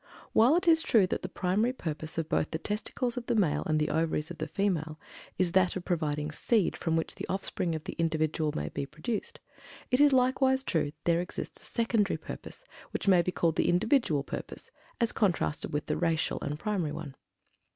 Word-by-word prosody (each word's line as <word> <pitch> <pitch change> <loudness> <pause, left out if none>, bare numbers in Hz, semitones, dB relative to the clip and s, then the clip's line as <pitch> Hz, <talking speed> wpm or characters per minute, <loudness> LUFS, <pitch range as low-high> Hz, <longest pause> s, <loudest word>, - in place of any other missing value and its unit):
While 240 +8 +6
it 355 +1 0
is 325 -1 +6
true 225 - +4
that - - -2
the - - -5
primary 210 +7 0
purpose 160 - -5
of 165 -2 -1
both 155 - 0
the 160 - -2
testicles 225 +6 -2
of 240 - -5
the 240 - +1
male, 155 -9 +2
and 155 -1 +2
the 150 - 0
Ovaries 160 0 0
of 170 - -9
the 155 - -2
female, 160 -3 -1 0.4
is 180 -2 +1
that 185 -1 +3
of 185 - -5
providing 150 -3 -1
SEED 210 +5 +1
from 165 -1 -1
which 165 - -1
the - - -7
offspring 185 -3 0
of 155 - -5
the - - -5
individual 155 -1 +1
may 75 0 -2
be 140 - -4
produced, 160 +10 -4 0.5
it 250 +2 +4
is 290 -1 +7
likewise 265 +1 +3
true 165 - +1
that 145 - -10
there 170 0 +2
exists 180 - -6
a - - -13
secondary 230 -3 +1
purpose - - -9 0.2
which - - -4
may 185 -3 +6
be 180 - -1
called 165 -3 0
the - - +2
"individual" 175 - +2
purpose - - -7 0.3
as 235 -2 +2
contrasted 175 -7 0
with 150 +1 -2
the - - -1
"racial" 165 -2 0
and 150 - -3
primary 190 -4 -1
one. 145 -4 -6
175 Hz, 205 wpm, -29 LUFS, 155-220 Hz, 0.5 s, is